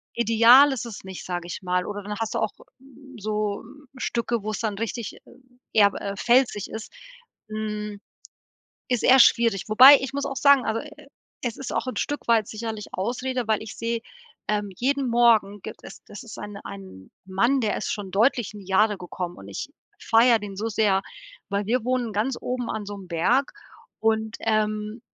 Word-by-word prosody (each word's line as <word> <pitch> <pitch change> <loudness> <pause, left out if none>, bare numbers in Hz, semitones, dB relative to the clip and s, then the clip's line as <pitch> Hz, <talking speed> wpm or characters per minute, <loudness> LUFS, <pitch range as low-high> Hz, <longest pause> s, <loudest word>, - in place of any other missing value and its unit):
ideal 235 +5 +6
ist 245 -2 -3
es 220 -4 -8
nicht, 190 -1 -8
sage 175 -1 -4
ich 175 - -6
mal 180 0 0
oder 205 -1 -5
dann 210 +1 -5
hast 225 -1 -3
du - - 0
auch 215 - 0 0.7
so, 210 -1 -2
ähm, 285 0 -16
Stücke, 235 -2 -2
wo 215 - -3
es 215 - -4
dann 210 -3 -2
richtig 230 0 -4 0.6
eher, 205 -2 +5
äh, 200 0 -4
felsig 240 -4 +2
ist. 220 0 -8 0.6
Hm. 210 -1 -4 0.9
Ist 245 -3 0
eher 260 +1 +7
schwierig, 230 -6 +4
wobei, 260 +6 +9
ich 265 -1 -4
muss 280 0 -2
auch 275 -1 -5
sagen, 280 -2 +5
also, 225 +1 -1
e 300 - -9
e 280 - -16 0.3
es 240 -3 -3
ist 270 - -5
auch - - -1
'n - - -4
Stück 290 - -3
weit 225 -3 +4
sicherlich 220 -1 -5
Ausrede, 245 +4 -3
weil 220 -1 +2
ich 220 - -9
sehe, 230 0 -2 0.5
ähm, 210 -1 -1
jeden 270 +1 0
Morgen 225 -4 +3
gibt - - -9
es - - -11
das 205 - -10
ist 225 - -10
ein 205 -1 -7
ein 190 - -10 0.2
Mann, 235 +9 +2
der 215 -4 0
ist - - -3
schon 205 -3 -6
deutlich 225 +1 +2
in 205 - -9
die 190 - -14
Jahre 210 +2 +3
gekommen 180 0 -6
und 95 - -12
ich 100 - -6 0.3
feiere 230 +1 +4
den 200 -2 -7
so 220 +3 -2
sehr, 205 -3 +2 0.5
weil 200 0 -1
wir 240 +1 0
wohnen 250 -2 -1
ganz 220 +5 -1
oben 250 -1 -3
an 210 -2 -4
so 205 - -6
'nem 190 -3 -12
Berg 235 - +1 0.5
und, 220 0 0
ähm, 215 +1 -1
220 Hz, 195 wpm, -24 LUFS, 205-240 Hz, 0.9 s, wobei